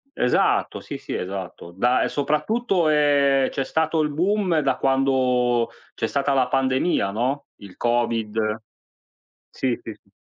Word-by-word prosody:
Esatto, 125 - +1
sì, - - -7
sì - - -7
esatto. 95 -2 -6
Da, 120 +8 +2
e - - -1
soprattutto 175 - 0
è 140 -3 +3
c'è 135 - -2
stato 160 +2 0
il 150 - 0
boom, 180 +2 +1
da 140 -3 0
quando 130 -3 +2 0.2
c'è - - -2
stata 140 0 0
la 130 -2 +2
pandemia, 130 - +1
no, 130 +7 -2
il 100 -3 -13
Covid. 115 -2 0 0.9
Sì, 125 -3 -2
sì, 115 - -7
sì. - - -33
135 Hz, 140 wpm, -23 LUFS, 120-150 Hz, 0.9 s, è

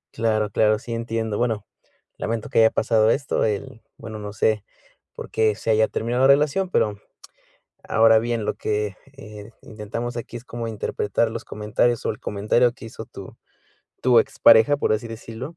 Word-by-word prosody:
Claro, 110 -2 0
claro, 110 +1 +3
sí 115 +1 -7
entiendo. 115 -2 -3
Bueno, 110 -4 -1 0.5
lamento 115 -1 -3
que - - +1
haya 110 0 +6
pasado 110 -1 +2
esto, 135 +2 0
el 110 +1 -3 0.2
bueno, 110 -2 -8
no 105 -1 -7
sé 110 -1 0 0.5
por - - -9
qué 110 -1 +2
se 110 - -4
haya 110 0 +4
terminado 120 +4 -2
la 135 - +6
relación, 150 +7 +3
pero, 105 - +1 0.9
ahora 110 0 +4
bien, 115 -1 -2
lo - - 0
que, 105 -2 -2 0.2
eh, 105 -3 -11
intentamos 115 +3 -6
aquí 120 +1 -6
es 120 - -13
como 115 -1 -5
interpretar 110 +1 -1
los 115 0 -6
comentarios 110 +3 -1
o - - +1
el 105 - -10
comentario 110 +4 +1
que 120 - -12
hizo 115 - -8
tu - - -11 0.7
tu 120 -2 +6
expareja, 115 +7 +5
por 125 - 0
así 110 +2 -2
decirlo. 115 +7 -8
110 Hz, 175 wpm, -23 LUFS, 105-120 Hz, 0.9 s, haya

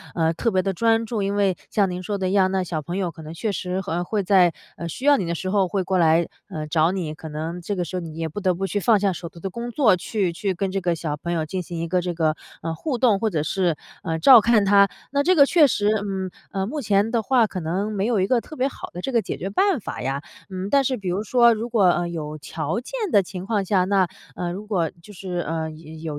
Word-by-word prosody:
呃， 165 -1 +2
特 230 - 0
别 190 -3 +1
地 195 - -1
专 225 +4 +2
注。 220 -1 -2
因 200 +1 -1
为 200 -3 +2
像 200 -3 +1
您 180 0 -4
说 200 +2 -3
的 190 -1 -1
一 - - -2
样， 190 -1 +4
那 190 0 0
小 165 -3 -3
朋 175 +5 -5
友 185 -3 -1
可 160 - -12
能 155 +1 -8
确 215 +5 -2
实 185 0 -3
和 175 -1 -2
会 205 +2 -1
在， 180 -2 +5 0.3
呃， 170 - -5
需 255 - -6
要 290 0 +7
你 220 - -1
的 170 - -1
时 185 +3 -3
候 195 -2 +2
会 190 +2 -1
过 185 0 0
来， 165 0 +4 0.2
呃， 155 -1 -5
找 160 +2 +2
你， 175 -5 -3
可 160 0 -9
能 160 +3 -5
这 200 +4 -3
个 180 -2 -2
时 185 - -6
候 - - 0
你 165 -3 -8
也 165 0 -2
不 160 +6 -6
得 185 -3 +1
不 195 +3 -2
去 205 +2 -1
放 215 +1 +4
下 195 -1 +1
手 170 0 -7
头 170 - -14
的 190 +3 -5
工 235 +4 -5
作， 240 -5 +4
去 185 0 -2
去 190 +2 -2
跟 190 +2 -2
这 195 0 -2
个 175 -1 +1
小 155 -2 -3
朋 170 +3 -3
友 160 -2 -1
进 185 +4 -3
行 170 -1 -6
一 165 - -2
个 180 +2 +1
这 175 -1 -3
个， 160 -2 +1 0.3
呃， 165 0 -2
互 255 - -3
动， 230 -5 +3
或 220 - +1
者 160 -6 -1
是， 175 0 0 0.3
呃， 165 -5 -2
照 235 +8 +8
看 220 -1 +3
他。 200 0 +5 0.2
那 280 +1 +2
这 365 +6 +3
个 285 -4 +7
确 310 0 +5
实， 205 -5 +1
嗯， 195 -3 -3 0.2
呃， 190 -1 -1
目 290 +8 -4
前 210 -1 +2
的 235 -1 +1
话 240 +1 +3
可 195 -3 -5
能 185 +6 -2
没 205 0 -1
有 235 -4 +1
一 185 - +2
个 240 +3 +2
特 310 - -11
别 265 -1 +1
好 275 - -8
的 180 - -7
这 270 - -3
个 235 -3 +3
解 185 - -5
决 190 - -4
办 385 - +2
法 - - -6
呀。 135 +3 -2 0.3
嗯， 190 +1 -4
但 280 +2 +4
是 260 - +1
比 200 -6 -4
如 190 +4 -1
说 235 +1 +5
如 225 +1 -3
果 225 -4 +2
呃， 175 -1 +3
有 155 -3 -5
条 155 +5 -3
件 250 - -12 0.2
的 205 - +6
情 185 0 -7
况 205 -2 0
下， 190 -1 +2
那， 190 -1 +2 0.3
呃， 175 -1 -3
如 200 +3 -7
果 180 -7 0
就 210 - -13
是， 185 -2 -5
呃， 160 -2 -2
有 160 +1 -9
190 Hz, 305 characters per minute, -23 LUFS, 170-210 Hz, 0.3 s, 照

